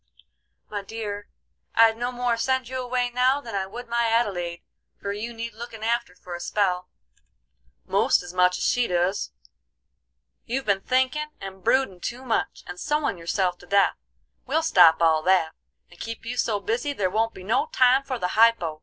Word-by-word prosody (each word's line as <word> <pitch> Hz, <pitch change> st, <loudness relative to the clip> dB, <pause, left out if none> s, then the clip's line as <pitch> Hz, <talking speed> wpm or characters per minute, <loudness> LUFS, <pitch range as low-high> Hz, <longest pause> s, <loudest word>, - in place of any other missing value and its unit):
"My 205 Hz, -1 st, -4 dB
dear, 205 Hz, 0 st, -6 dB, 0.5 s
I'd 225 Hz, -1 st, +6 dB
no 240 Hz, +2 st, -2 dB
more 245 Hz, -1 st, 0 dB
send 260 Hz, +1 st, 0 dB
you 260 Hz, +1 st, -4 dB
away 245 Hz, 0 st, -1 dB
now 255 Hz, +3 st, +3 dB
than 235 Hz, -6 st, -9 dB
I 195 Hz, -1 st, -1 dB
would 240 Hz, +5 st, -8 dB
my 235 Hz, 0 st, +1 dB
Adelaide, 185 Hz, -7 st, -1 dB, 0.4 s
for 200 Hz, 0 st, -3 dB
you 220 Hz, +3 st, -5 dB
need 230 Hz, 0 st, -6 dB
looking 225 Hz, -1 st, -9 dB
after 235 Hz, -4 st, -1 dB
for 180 Hz, -1 st, -10 dB
a 175 Hz, -, -5 dB
spell, 180 Hz, -1 st, 0 dB, 1.0 s
most -, -, +2 dB
as 175 Hz, 0 st, -9 dB
much 180 Hz, 0 st, +3 dB
as -, -, -3 dB
she 245 Hz, -1 st, +2 dB
doos. 180 Hz, +3 st, 0 dB, 1.1 s
You've 265 Hz, +3 st, -3 dB
been 200 Hz, -2 st, +1 dB
thinkin' 260 Hz, +6 st, 0 dB
and 190 Hz, -1 st, -9 dB
broodin' 260 Hz, -8 st, +2 dB
too 245 Hz, +7 st, -5 dB
much, 230 Hz, -, -1 dB
and 180 Hz, 0 st, -8 dB
sewin' 295 Hz, -, -1 dB
yourself 180 Hz, +1 st, -1 dB
to 180 Hz, -, -16 dB
death. 200 Hz, +1 st, +4 dB, 0.5 s
We'll 315 Hz, +5 st, +1 dB
stop 175 Hz, -, +6 dB
all 160 Hz, -1 st, +4 dB
that, 175 Hz, -2 st, +2 dB, 0.4 s
and 175 Hz, -, -17 dB
keep 230 Hz, 0 st, -6 dB
you 240 Hz, +2 st, -4 dB
so 220 Hz, -4 st, 0 dB
busy 235 Hz, +8 st, -2 dB
there 190 Hz, -8 st, -1 dB
won't 225 Hz, +2 st, 0 dB
be 185 Hz, -, -10 dB
no 230 Hz, -, +1 dB
time 255 Hz, +1 st, +5 dB
for 270 Hz, -2 st, -4 dB
the 180 Hz, -6 st, -2 dB
hypo. 215 Hz, -9 st, +3 dB
225 Hz, 180 wpm, -25 LUFS, 185-245 Hz, 1.1 s, I'd